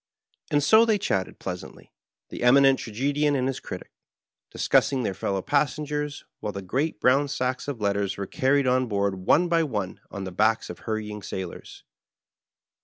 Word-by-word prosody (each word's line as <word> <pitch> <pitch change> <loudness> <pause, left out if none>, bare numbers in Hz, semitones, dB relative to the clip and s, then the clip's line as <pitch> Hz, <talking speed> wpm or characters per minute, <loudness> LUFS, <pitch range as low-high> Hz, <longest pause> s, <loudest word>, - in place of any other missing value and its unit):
And 145 -1 +2
so 220 +8 +6
they 225 -2 +3
chatted 95 - -2
pleasantly, 90 -1 -8 0.4
the - - -7
Eminent 135 +2 +5
Trage^ 125 +6 -2
dian 145 0 +2
and 130 -2 0
his 135 - -2
Critic, - - -8 0.6
discussing 130 -2 +2
their 100 - -1
fellow 95 0 -2
passengers, 150 0 -1
while 105 - -3
the 100 -1 -6
great 130 - -1
brown 135 +5 +3
sacks 130 -2 -2
of 140 -5 -4
letters 100 -1 0
were 100 - -3
carried 135 +7 +1
on 130 0 +2
board 100 -3 -1
one 175 +3 +5
by 170 -1 +3
one 105 - -3
on 100 - -6
the 95 - -5
backs 110 +4 +1
of - - -11
hurrying 105 -1 -4
sailors. 95 -2 -7
125 Hz, 170 wpm, -25 LUFS, 100-145 Hz, 0.6 s, so